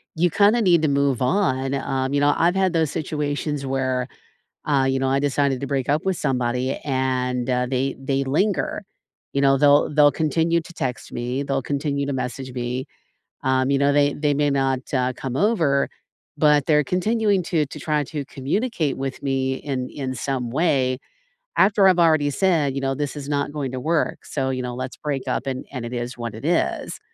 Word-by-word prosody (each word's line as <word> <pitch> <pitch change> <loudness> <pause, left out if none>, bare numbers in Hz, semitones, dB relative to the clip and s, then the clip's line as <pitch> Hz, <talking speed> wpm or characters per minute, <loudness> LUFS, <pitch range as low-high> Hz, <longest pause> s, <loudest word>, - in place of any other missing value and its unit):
you 175 +2 +2
kinda 210 +4 +4
need 175 -6 +4
to - - +4
move 140 -3 +1
on, 135 -4 +1
um, 135 0 -1
you 145 - +2
know, 145 0 +4
I've 170 +2 +3
had 190 -2 +2
those 160 -4 +1
situations 150 -2 -3
where, 130 -1 -1 0.6
uh, 140 -3 +2
you 135 0 0
know, 135 - +1
I 135 +1 +2
decided 140 -2 +1
to 140 - -3
break 135 -2 -2
up 150 +2 +1
with 190 -2 0
somebody 125 0 -1
and, 130 -2 -1
uh, 125 0 +1
they 135 +1 -1
they 135 0 -1
linger, 190 +8 0 0.5
you 140 - 0
know, 135 -1 +4
they'll 145 +1 +4
they'll 145 -1 +5
continue 160 +3 +1
to 170 - -12
text 125 -6 -4
me, 125 +3 -2
they'll 135 -1 -1
continue 140 +1 -2
to 140 - -2
message 130 0 -4
me, 125 +1 -3 0.6
um, 130 0 +1
you 140 - +3
know, 140 +1 +3
they 145 0 +3
they 145 -1 0
may 145 0 +1
not, 135 -2 +1
uh, 130 -1 +1
come 130 -2 -5
over, 165 -8 +2 0.5
but 150 -2 +4
they're 150 -2 +4
continuing 205 - +1
to 160 -3 +1
to 150 - -9
try 150 -1 0
to 150 +1 -5
communicate 155 - -2
with 135 0 -4
me 135 -1 0
in 130 -3 -4
in 130 -2 -4
some 130 -2 -3
way 130 -3 +1 0.6
after 195 0 +5
I've 180 -2 +4
already 155 -4 +4
said, 155 -4 +1
you 135 - -2
know, 135 0 -1
"This 145 +1 -3
is 145 -1 -6
not 145 0 -1
going 140 -4 -3
to 130 - -4
work." 160 +4 -1
So, 135 -2 -2
you 130 -1 -2
know, 125 0 -4
"Let's 130 +1 -5
break 140 -3 -3
up - - -2
and 130 -1 -4
and 125 -4 -5
it 120 - -7
is 120 0 -4
what 115 -2 -4
it 110 - -9
is." 165 - 0
140 Hz, 200 wpm, -23 LUFS, 130-150 Hz, 0.6 s, they'll